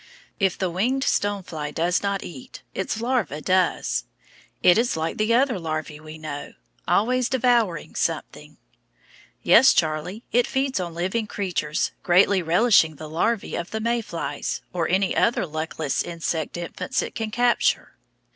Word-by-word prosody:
If 195 Hz, -3 st, +1 dB
the 185 Hz, -2 st, -1 dB
winged 250 Hz, +10 st, 0 dB
stone 205 Hz, -5 st, 0 dB
fly 150 Hz, -4 st, -5 dB
does 170 Hz, +4 st, 0 dB
not 200 Hz, -1 st, -1 dB
eat, 135 Hz, -7 st, -10 dB
its 205 Hz, +3 st, -3 dB
larva 235 Hz, -, 0 dB
does; 180 Hz, -, +1 dB, 0.6 s
it 180 Hz, +4 st, +6 dB
is 240 Hz, -7 st, 0 dB
like 160 Hz, +1 st, -2 dB
the 220 Hz, +2 st, +3 dB
other 250 Hz, -5 st, +2 dB
larvæ 155 Hz, -2 st, -4 dB
we 155 Hz, 0 st, -10 dB
know, 155 Hz, -2 st, -7 dB, 0.3 s
always 240 Hz, +8 st, +2 dB
devouring 240 Hz, -7 st, +1 dB
something. -, -, -3 dB, 0.9 s
Yes, 265 Hz, -, +7 dB
Charlie, 160 Hz, +7 st, -1 dB
it 245 Hz, +1 st, +3 dB
feeds 265 Hz, -4 st, 0 dB
on 170 Hz, -2 st, -4 dB
living 190 Hz, +6 st, -1 dB
creatures, 175 Hz, -7 st, -2 dB
greatly 185 Hz, +2 st, +4 dB
relishing 170 Hz, -1 st, +4 dB
the 155 Hz, +2 st, -8 dB
larvæ 215 Hz, +6 st, 0 dB
of 170 Hz, -, -5 dB
the 220 Hz, -, -3 dB
May 235 Hz, +1 st, 0 dB
flies, 165 Hz, -8 st, -4 dB
or 170 Hz, -3 st, -1 dB
any 190 Hz, +2 st, +1 dB
other 235 Hz, -4 st, +2 dB
luckless 155 Hz, -2 st, -2 dB
insect 165 Hz, -2 st, -3 dB
infants 175 Hz, +9 st, -3 dB
it -, -, -6 dB
can 225 Hz, -2 st, -3 dB
capture. 240 Hz, +2 st, +1 dB
185 Hz, 150 wpm, -24 LUFS, 160-230 Hz, 0.9 s, Yes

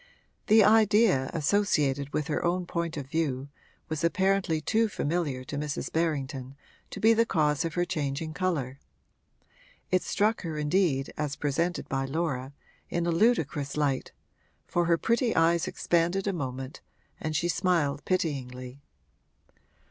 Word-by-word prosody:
The 220 Hz, 0 st, +7 dB
idea 210 Hz, -, +4 dB
associated 145 Hz, -5 st, +1 dB
with 150 Hz, -, -1 dB
her 155 Hz, -, -2 dB
own 175 Hz, +1 st, 0 dB
point 170 Hz, -2 st, -3 dB
of 140 Hz, -, -4 dB
view 140 Hz, -2 st, -2 dB, 0.4 s
was 155 Hz, 0 st, -3 dB
apparently 190 Hz, -1 st, +2 dB
too 220 Hz, +8 st, +1 dB
familiar 150 Hz, -7 st, -2 dB
to 145 Hz, +2 st, -5 dB
Mrs. 150 Hz, -1 st, -3 dB
Berrington 140 Hz, -5 st, -2 dB, 0.3 s
to -, -, -7 dB
be 225 Hz, +1 st, +5 dB
the 230 Hz, +1 st, +4 dB
cause 150 Hz, -7 st, +1 dB
of 165 Hz, -1 st, -4 dB
her 175 Hz, 0 st, +1 dB
changing 155 Hz, -2 st, -3 dB
colour; 150 Hz, -8 st, -2 dB, 1.1 s
it 185 Hz, 0 st, +3 dB
struck 215 Hz, +2 st, +1 dB
her 160 Hz, -3 st, -4 dB
indeed, 150 Hz, -3 st, +1 dB
as 150 Hz, -2 st, -2 dB
presented 165 Hz, +6 st, -1 dB
by 135 Hz, 0 st, -1 dB
Laura, 135 Hz, -3 st, -2 dB, 0.4 s
in 170 Hz, 0 st, -1 dB
a 170 Hz, -, +1 dB
ludicrous 165 Hz, -, +1 dB
light, 140 Hz, -3 st, 0 dB, 0.5 s
for 175 Hz, 0 st, 0 dB
her 170 Hz, 0 st, +3 dB
pretty 235 Hz, +5 st, +1 dB
eyes 165 Hz, +1 st, +3 dB
expanded 175 Hz, +3 st, 0 dB
a 200 Hz, -, 0 dB
moment 130 Hz, -3 st, -5 dB, 0.4 s
and 155 Hz, 0 st, -3 dB
she 170 Hz, -, +1 dB
smiled 165 Hz, -6 st, +1 dB
pityingly. 130 Hz, -7 st, -3 dB
160 Hz, 140 wpm, -28 LUFS, 140-180 Hz, 1.1 s, The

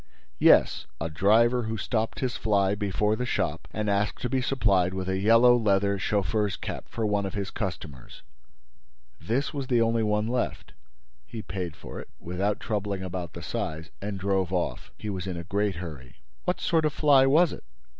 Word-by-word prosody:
"Yes, -, -, +5 dB
a 80 Hz, +1 st, -3 dB
driver 115 Hz, +8 st, +3 dB
who 110 Hz, 0 st, -3 dB
stopped 110 Hz, +1 st, -2 dB
his 130 Hz, -2 st, -1 dB
fly 100 Hz, -3 st, +2 dB
before 105 Hz, +1 st, 0 dB
the 125 Hz, -, -3 dB
shop 85 Hz, -6 st, -2 dB
and 110 Hz, -1 st, -3 dB
asked 100 Hz, +1 st, 0 dB
to 125 Hz, -, 0 dB
be 130 Hz, -1 st, +1 dB
supplied 100 Hz, -9 st, +2 dB
with 95 Hz, -1 st, -3 dB
a 95 Hz, 0 st, 0 dB
yellow 115 Hz, +4 st, +6 dB
leather 100 Hz, -3 st, +2 dB
chauffeur's 100 Hz, +1 st, 0 dB
cap -, -, -6 dB
for 115 Hz, -, -2 dB
one 105 Hz, -1 st, +1 dB
of 95 Hz, -, -7 dB
his 100 Hz, -1 st, -3 dB
customers. 80 Hz, -, -6 dB, 1.0 s
This 130 Hz, +8 st, -1 dB
was 140 Hz, -3 st, -4 dB
the 120 Hz, -2 st, +3 dB
only 115 Hz, 0 st, +2 dB
one 105 Hz, 0 st, +1 dB
left. 125 Hz, +1 st, -2 dB, 0.5 s
He 110 Hz, -2 st, -7 dB
paid 90 Hz, -4 st, -5 dB
for -, -, -9 dB
it, -, -, -10 dB
without 95 Hz, +4 st, -2 dB
troubling 100 Hz, -3 st, -2 dB
about 90 Hz, -3 st, -5 dB
the -, -, -8 dB
size, 80 Hz, +1 st, -4 dB
and 100 Hz, 0 st, -4 dB
drove 95 Hz, -2 st, 0 dB
off. 90 Hz, -2 st, -2 dB
He 105 Hz, -, -5 dB
was 95 Hz, -1 st, -4 dB
in 90 Hz, -2 st, -3 dB
a 85 Hz, -, -5 dB
great 100 Hz, +2 st, -1 dB
hurry." 75 Hz, -8 st, -8 dB, 0.3 s
"What 180 Hz, 0 st, 0 dB
sort 160 Hz, -2 st, +1 dB
of 150 Hz, -, +1 dB
fly 140 Hz, -4 st, +5 dB
was 155 Hz, +4 st, +4 dB
it?" -, -, -9 dB
105 Hz, 185 wpm, -27 LUFS, 95-115 Hz, 1.0 s, yellow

